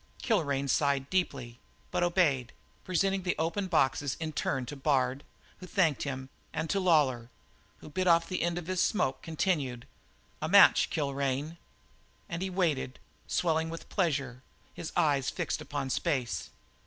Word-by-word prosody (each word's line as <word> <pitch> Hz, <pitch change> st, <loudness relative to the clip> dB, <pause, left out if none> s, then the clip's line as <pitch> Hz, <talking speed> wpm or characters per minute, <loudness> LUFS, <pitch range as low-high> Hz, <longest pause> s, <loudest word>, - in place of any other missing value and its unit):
Kilrain 140 Hz, -, +1 dB
sighed 140 Hz, 0 st, +1 dB
deeply, 135 Hz, -10 st, -1 dB, 0.3 s
but 180 Hz, -, 0 dB
obeyed, 160 Hz, -9 st, +2 dB, 0.3 s
presenting 195 Hz, +2 st, +1 dB
the 180 Hz, -1 st, -1 dB
open 170 Hz, +5 st, -1 dB
boxes 140 Hz, -4 st, +1 dB
in 160 Hz, -1 st, -4 dB
turn 135 Hz, -3 st, -1 dB
to 145 Hz, -, -7 dB
Bard, 135 Hz, -1 st, +1 dB, 0.4 s
who 180 Hz, -, -9 dB
thanked 165 Hz, -7 st, +2 dB
him, 130 Hz, -2 st, -4 dB, 0.2 s
and 160 Hz, +1 st, -2 dB
to 200 Hz, -, +1 dB
Lawlor, 145 Hz, -10 st, +2 dB, 0.5 s
who -, -, -10 dB
bit 185 Hz, +4 st, -1 dB
off 165 Hz, -1 st, +5 dB
the 185 Hz, -, -2 dB
end 170 Hz, 0 st, 0 dB
of 175 Hz, -, -4 dB
his 185 Hz, 0 st, 0 dB
smoke 135 Hz, -, +1 dB
continued: 150 Hz, -7 st, -1 dB, 0.6 s
"A 155 Hz, -, -2 dB
match, 200 Hz, +3 st, +7 dB
Kilrain." 140 Hz, +1 st, -2 dB, 0.7 s
And 170 Hz, -3 st, -4 dB
he 190 Hz, -, -1 dB
waited, 160 Hz, -9 st, 0 dB, 0.3 s
swelling 160 Hz, -2 st, +1 dB
with 165 Hz, 0 st, -8 dB
pleasure, 135 Hz, -, -1 dB, 0.3 s
his 165 Hz, -, -6 dB
eyes 140 Hz, -4 st, +2 dB
fixed -, -, -3 dB
upon 140 Hz, -2 st, -4 dB
space. 130 Hz, -3 st, -1 dB
155 Hz, 150 wpm, -30 LUFS, 135-175 Hz, 0.7 s, match